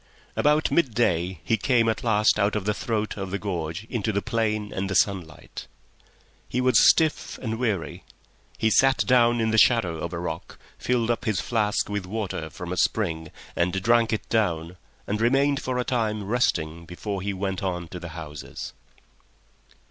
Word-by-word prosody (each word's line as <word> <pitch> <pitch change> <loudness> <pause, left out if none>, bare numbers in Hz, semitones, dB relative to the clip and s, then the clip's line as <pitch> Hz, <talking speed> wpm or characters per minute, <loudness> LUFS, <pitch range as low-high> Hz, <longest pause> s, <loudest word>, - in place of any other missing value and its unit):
About 150 +1 +2
midday 100 - +1
he 115 - +1
came 120 -3 +2
at 110 -1 -1
last 105 -2 +3
out 100 +1 +2
of 105 -3 -2
the 105 - +1
throat 110 0 -2
of 95 -2 -4
the 100 - -2
gorge 85 -3 -4
into 110 -3 -1
the 100 - 0
plain 110 -3 -1
and 95 +1 -2
the 95 - -2
sunlight. 85 -7 -1 0.8
He 125 - -1
was 130 0 +6
stiff 160 -2 +1
and 110 -2 -4
weary; 105 -9 -2 0.5
he 110 - +2
sat 135 +4 +4
down 120 -2 +4
in 110 -1 +1
the 110 - +4
shadow 100 -10 +4
of 85 +2 -4
a 85 - -4
rock, 85 -1 -5 0.2
filled 120 -2 +1
up 120 +1 -3
his 110 -5 0
flask 105 0 0
with 105 -2 -3
water 95 -6 -4
from 90 +3 -6
a - - -5
spring 80 -7 0 0.3
and 90 +2 +1
drank 115 0 +3
it 110 - -2
down, 90 -6 0 0.3
and 105 +2 -2
remained 135 +4 +3
for 130 -1 -2
a 125 - +1
time, 110 -4 -1
resting 85 -7 0
before 95 +3 -5
he 100 +2 -2
went 95 -1 -3
on 90 -3 -3
to 90 - -7
the 85 -1 -7
houses. 75 -3 -7
105 Hz, 180 wpm, -25 LUFS, 90-115 Hz, 0.8 s, was